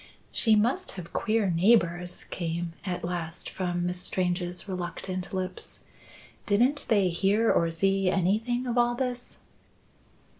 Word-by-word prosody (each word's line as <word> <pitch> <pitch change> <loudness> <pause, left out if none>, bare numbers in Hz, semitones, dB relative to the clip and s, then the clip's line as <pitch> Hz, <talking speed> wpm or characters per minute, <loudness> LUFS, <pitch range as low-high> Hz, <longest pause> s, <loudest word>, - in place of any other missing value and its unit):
"She 220 -3 +4
must 250 - +1
have 175 -3 -9
queer 215 -4 +1
neighbours," 175 -1 +2
came 170 -1 -4
at 180 -3 -3
last, 170 -1 -3
from 175 -2 -2
Miss 180 0 -2
Strange's 180 0 -1
reluctant 185 0 -4
lips. 185 -1 -4 0.7
"Didn't 245 +8 +2
they 200 -4 +4
hear 200 +6 +2
or 170 - +2
see 195 +3 +1
anything 220 +7 +1
of 245 -1 0
all 240 0 +3
this?" 250 -1 -4
185 Hz, 125 wpm, -28 LUFS, 175-225 Hz, 0.7 s, She